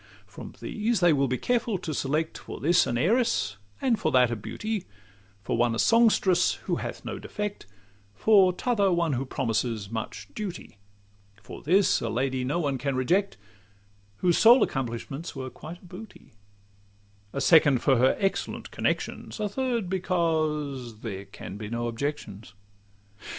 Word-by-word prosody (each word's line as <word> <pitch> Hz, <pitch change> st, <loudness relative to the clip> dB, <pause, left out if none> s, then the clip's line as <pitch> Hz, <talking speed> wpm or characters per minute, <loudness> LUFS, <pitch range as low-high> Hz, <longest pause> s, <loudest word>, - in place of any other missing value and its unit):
From -, -, -11 dB
these 220 Hz, 0 st, -1 dB
they 175 Hz, -3 st, +5 dB
will 140 Hz, -1 st, +2 dB
be 130 Hz, 0 st, -1 dB
careful 235 Hz, -, 0 dB
to 170 Hz, -3 st, -5 dB
select, 150 Hz, +4 st, -1 dB
For -, -, -8 dB
this 170 Hz, +4 st, +3 dB
an 120 Hz, -, -1 dB
heiress, 125 Hz, -, +1 dB, 0.2 s
and 235 Hz, -5 st, +1 dB
for 155 Hz, -, 0 dB
that 125 Hz, -2 st, +5 dB
a -, -, 0 dB
beauty; 145 Hz, -, -4 dB, 0.6 s
For -, -, -1 dB
one 120 Hz, 0 st, +2 dB
a -, -, -3 dB
songstress 205 Hz, -, +4 dB
who -, -, -1 dB
hath -, -, -6 dB
no -, -, -5 dB
defect, 210 Hz, -, -5 dB, 0.5 s
For 195 Hz, -, +5 dB
t' 180 Hz, -, -10 dB
other 200 Hz, -5 st, +3 dB
one 170 Hz, -3 st, +1 dB
who 130 Hz, +1 st, -2 dB
promises 115 Hz, -5 st, -2 dB
much 110 Hz, -1 st, -5 dB
duty; 185 Hz, -, -7 dB, 0.6 s
For -, -, -10 dB
this 185 Hz, +6 st, +3 dB
a -, -, -2 dB
lady 130 Hz, +2 st, -1 dB
no 135 Hz, +6 st, -1 dB
one 140 Hz, -5 st, -1 dB
can 140 Hz, 0 st, -1 dB
reject, 180 Hz, -, +1 dB, 0.8 s
Whose 175 Hz, -2 st, +2 dB
sole 240 Hz, +3 st, +7 dB
accomplishments 135 Hz, +5 st, -4 dB
were 130 Hz, -1 st, -5 dB
quite 170 Hz, +4 st, -10 dB
a -, -, -14 dB
booty; 190 Hz, +5 st, -12 dB, 1.0 s
A 140 Hz, -, -3 dB
second 150 Hz, -4 st, +5 dB
for 135 Hz, -3 st, +4 dB
her 130 Hz, +2 st, +4 dB
excellent 195 Hz, -1 st, -2 dB
connections; -, -, -2 dB
A 210 Hz, -, 0 dB
third, 235 Hz, -1 st, -1 dB
because 155 Hz, -, -1 dB
there 100 Hz, -4 st, -6 dB
can 95 Hz, 0 st, -9 dB
be 105 Hz, 0 st, -6 dB
no 120 Hz, +1 st, -2 dB
objections. 115 Hz, -5 st, -5 dB
150 Hz, 160 wpm, -27 LUFS, 120-190 Hz, 1.0 s, sole